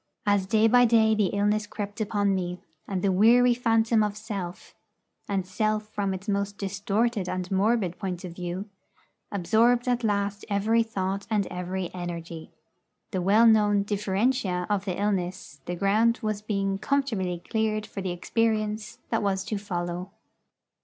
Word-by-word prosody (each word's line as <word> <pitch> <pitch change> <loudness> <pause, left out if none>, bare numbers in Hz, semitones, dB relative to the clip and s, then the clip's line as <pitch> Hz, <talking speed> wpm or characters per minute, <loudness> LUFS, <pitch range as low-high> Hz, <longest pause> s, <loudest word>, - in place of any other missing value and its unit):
As 205 -2 +2
day 220 +1 +4
by 245 +2 +6
day 220 -1 +4
the 210 -2 +2
illness 205 +2 0
crept 205 0 -5
upon 205 -2 +1
me, 180 -1 -2 0.3
and 190 -2 -3
the 200 - +3
weary 240 +6 +5
phantom 225 -2 +2
of 210 -1 -1
Self 200 -5 -6 0.6
and 195 -2 0
Self 215 +2 -1
from 200 -2 -1
its 190 +3 -9
most 200 0 -1
distorted 200 +1 -1
and 185 0 -4
morbid 195 -2 +1
point 185 -3 -4
of 180 - -6
view 180 +3 -5 0.6
absorbed 230 +6 +2
at 245 -1 +1
last 200 -1 -1
every 215 +3 +2
thought 195 -3 -3
and 210 -3 +1
every 180 0 -4
energy, 170 -2 -6 0.6
the 190 -3 -1
well 205 +6 +5
known 210 -2 +4
'differentia' 200 -2 0
of 200 -1 0
the 185 -2 -3
illness, 185 -7 -2
the 175 - -3
ground 215 +5 +3
was 215 -1 -1
being 195 -2 -1
comfortably 215 -9 0
cleared 215 -1 0
for 195 - -7
the 190 - -3
experience 215 +3 -1
that - - +1
was 195 -2 0
to 210 - -3
follow. 175 -2 -4
205 Hz, 155 wpm, -26 LUFS, 190-220 Hz, 0.6 s, by